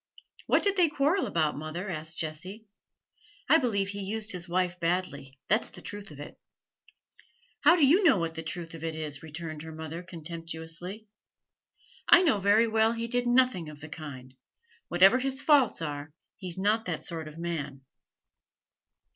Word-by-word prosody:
'What - - +3
did 400 -1 +2
they 350 -3 +5
quarrel 300 +6 +1
about, 155 -3 0
mother?' 155 +6 -5
asked 160 0 -5
Jessie. 180 +8 -5 0.8
'I 320 - +6
believe 200 -7 0
he 200 0 -5
used 215 +2 -2
his 180 -1 -4
wife 180 0 0
badly, 165 -6 -2
that's 215 +3 +1
the - - -12
truth 205 -1 -6
of 145 -2 -12
it.' 145 - -10 1.2
'How 345 - +6
do 320 -5 +5
you 345 +10 +5
know 285 - +6
what 165 -2 -2
the 165 - -5
truth 165 +1 -6
of 165 -1 -9
it 160 -1 -3
is?' 150 -3 -4
returned 160 0 -7
her 160 0 -8
mother, 160 +1 -6
contemptuously. 170 +3 -7 1.0
'I - - +8
know 270 - +3
very 205 +4 +4
well 220 0 +3
he 230 0 -3
did 245 +1 0
nothing 240 -10 +3
of 150 -1 -11
the 155 +1 -10
kind; 135 -5 -9 0.5
whatever 190 +8 +5
his 270 +1 -1
faults 275 - +3
are, 145 0 -5 0.2
he's 180 -2 -5
not 210 +4 +1
that 170 -4 -3
sort 165 -3 -4
of 155 +1 -11
man.' 150 -5 -4
175 Hz, 170 wpm, -29 LUFS, 160-220 Hz, 1.2 s, I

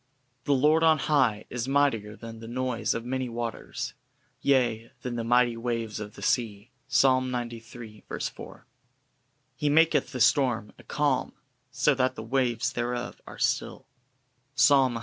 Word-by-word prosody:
'" 125 +1 -45
"The 145 - +3
Lord 150 +4 +4
on 160 -1 +5
high 130 -8 +1
is 125 0 -3
mightier 135 -7 +1
than 115 0 -9
the 115 - -9
noise 120 -2 -1
of 115 - -4
many 130 0 -2
waters, 115 -1 -5 0.5
yea, 120 -5 +1
than 125 -1 -3
the 115 - -2
mighty 120 0 +3
waves 115 -2 -3
of 105 -1 -8
the 100 - -10
sea:" 110 0 -1 0.2
Psa. 135 0 +4
xciii. 120 -3 -6 0.3
4. - - -12 0.9
"He 145 +3 0
maketh 160 -3 +3
the 130 - -5
storm 125 -5 +2
a - - -14
calm, 145 -4 0 0.4
so 140 +3 +2
that 130 -1 0
the - - -6
waves 120 -1 0
thereof 120 0 -3
are - - -10
still:" - - -1 0.7
Psa. 145 - +6
cvii. - - +7
29. 120 -2 -4
125 Hz, 160 wpm, -27 LUFS, 115-135 Hz, 0.9 s, cvii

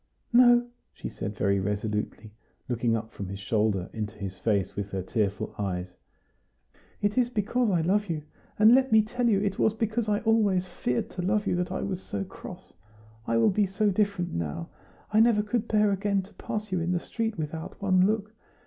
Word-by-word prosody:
"No!" 240 0 +7 0.3
she - - -6
said 105 0 -6
very 100 -1 +2
resolutely, 105 +2 -3 0.4
looking 120 -1 +1
up 110 0 -7
from 100 -5 -6
his 100 +1 -5
shoulder 100 -1 0
into 110 0 -4
his 95 -2 -6
face, 100 -4 0
with 100 -1 -3
her 95 -1 -3
tearful 100 0 -1
eyes; 90 -2 -3 1.1
"it 205 +4 +2
is 245 -1 +2
because 235 +1 0
I 175 -4 +2
love 200 +4 +1
you; 155 -3 -2 0.3
and 215 +2 +7
let 265 0 +4
me 220 -1 +6
tell 240 +2 0
you, 200 -3 +3
it 200 -2 -1
was 220 - +3
because 225 0 -1
I 205 0 +1
always 210 -5 +2
feared 125 -9 -2
to 180 - -4
love 205 +3 +1
you - - +1
that 180 0 -2
I 190 - -2
was 190 -2 -3
so 100 - -4
cross. - - -11 0.5
I 115 - +2
will 115 - +4
be 205 +1 +2
so 200 +2 +1
different 200 -3 0
now. 85 0 -3 0.4
I 215 - +5
never 225 -2 +5
could 215 +1 -1
bear 210 -1 +3
again 200 0 0
to 195 - -16
pass 215 -1 -5
you 185 - +1
in 170 +2 0
the 175 - +1
street 225 +3 -3
without 160 +1 -5
one 185 -2 +4
look! 215 0 -1
185 Hz, 200 wpm, -27 LUFS, -, 1.1 s, No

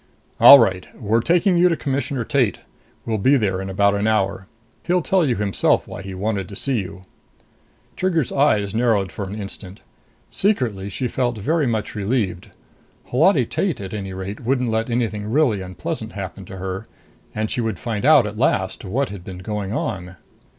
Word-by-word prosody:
"All 140 - +11
right. 95 -7 +1
We're 110 0 +1
taking 175 - +3
you 180 +1 +5
to 165 - 0
Commissioner 135 -2 -2
Tate. 125 -4 0 0.4
We'll 110 -2 -1
be 135 +8 +4
there 95 -5 -1
in 95 - -5
about 100 +1 +2
an 100 +1 0
hour. 95 -3 0 0.3
He'll 180 -1 0
tell 190 +1 +2
you 130 -6 +1
himself 100 -2 +1
why - - -7
he 95 -1 -7
wanted 100 0 -2
to 100 - -9
see 130 +2 -1
you." 95 -1 -8 0.9
Trigger's 170 -7 0
eyes 110 -9 +2
narrowed 110 -5 +1
for 100 - -5
an 95 +2 -6
instant. 100 -1 -9 0.5
Secretly 120 - 0
she 125 +5 -3
felt 120 -1 -1
very 150 +7 0
much 110 -3 -2
relieved. 100 -4 -2 0.6
Holati - - +4
Tate, - - -2
at 95 0 -7
any 100 -2 -5
rate, 95 +2 -6
wouldn't 125 -1 0
let 110 +2 -1
anything 110 -3 -2
really 120 -6 +2
unpleasant 90 -1 -5
happen - - -7
to 95 - -9
her 95 +3 -5 0.5
and 110 0 -2
she 125 - -1
would 110 -1 -2
find 115 -3 -4
out 145 -4 +6
at 105 +1 -6
last 95 -7 0
what 125 +8 -1
had 100 -3 -8
been 90 0 -8
going 100 +1 -4
on. 90 -5 -4
110 Hz, 180 wpm, -21 LUFS, 95-130 Hz, 0.9 s, All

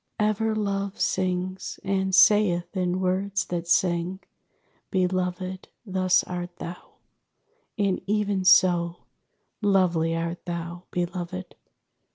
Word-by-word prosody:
_ 210 - +3
_Ever 220 +1 -1
Love 200 -1 -2
sings, 185 0 -1
and 190 -1 0
saith 200 -4 +4
in 180 0 0
words 190 +1 0
that 170 -1 -4
sing, 175 +1 +1 0.7
'Beloved, 185 0 -1 0.2
thus 185 -2 +2
art 175 -1 -6
thou; 175 +1 -9 0.8
and 200 -3 +1
even 205 -2 0
so 175 -2 +4 0.6
Lovely 175 -5 +2
art 170 +1 -3
thou, 170 0 -5
Beloved!' 180 +1 -4
185 Hz, 105 wpm, -26 LUFS, 175-195 Hz, 0.8 s, saith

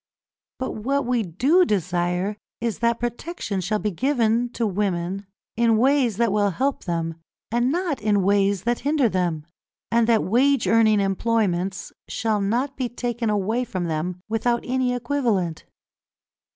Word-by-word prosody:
But 260 - -3
what 275 +6 -1
we 245 -1 +1
do 255 - +3
desire 180 - 0 0.2
is 230 -2 -2
that 235 0 +1
protection 240 - -3
shall 210 +4 0
be 210 0 -2
given 240 - +1
to 235 - -1
women 195 -1 -2 0.3
in 230 -1 +3
ways 255 -3 +3
that 235 -3 +2
will 205 0 +2
help 265 +9 -1
them 165 -2 -2 0.3
and 240 +2 +2
not 340 -3 -1
in 205 -2 +2
ways 200 -1 +2
that 240 +1 0
hinder 290 -2 +2
them, 175 -6 -1 0.5
and 230 -1 +3
that 230 -2 +3
wage 255 +4 +3
earning 220 0 +4
employments 195 -2 0
shall 220 -2 -1
not 245 +8 0
be 255 -2 -2
taken 240 -1 -2
away 210 +4 0
from 185 -7 -4
them 170 +3 -3
without 235 +2 0
any 255 0 0
equivalent. 235 - -1
225 Hz, 150 wpm, -23 LUFS, 195-245 Hz, 0.5 s, earning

